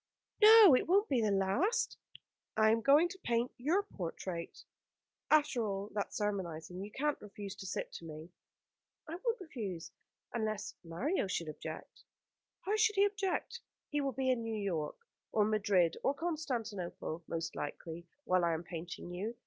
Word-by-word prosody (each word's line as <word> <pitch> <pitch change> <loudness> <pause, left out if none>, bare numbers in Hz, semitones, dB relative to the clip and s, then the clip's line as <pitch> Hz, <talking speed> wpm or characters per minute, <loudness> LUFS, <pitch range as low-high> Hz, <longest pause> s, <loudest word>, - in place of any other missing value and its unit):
"No, 425 - +10
it - - +1
won't 400 +5 +4
be 260 -4 +3
the 215 - +2
last." 265 - +1 0.6
"I 220 0 +6
am 225 0 +2
going 290 +7 +6
to 380 - -9
paint 240 -4 0
your 325 +11 +2
portrait. 175 - -6 0.7
After 295 -6 +4
all 200 -1 -3
that 205 -1 -2
sermonising 180 -4 -3
you 205 - -7
can't 290 +6 -1
refuse 205 -1 -7
to 195 - -7
sit - - -4
to 165 - -8
me." 155 +2 -9 0.8
"I - - -7
won't 475 0 0
refuse 215 - -6 0.4
unless 215 -2 -2
Mario 205 - -1
should 170 -3 -2
object." 155 - -8 0.6
"How 410 +3 0
should 435 -1 +3
he 395 +1 +5
object? 400 -2 -1 0.3
He 295 -1 0
will 275 -1 0
be 260 -1 +1
in 250 -2 0
New 225 -1 -3
York, 170 -7 -2 0.4
or 210 -2 +3
Madrid, 200 -5 +2
or 275 - +1
Constantinople, 230 - -3
most 165 -1 -3
likely, 165 +3 -6 0.2
while 185 -6 +2
I 170 -1 +3
am 160 - -5
painting 170 +1 -7
you. 205 +7 -4
215 Hz, 160 wpm, -34 LUFS, 180-295 Hz, 0.8 s, No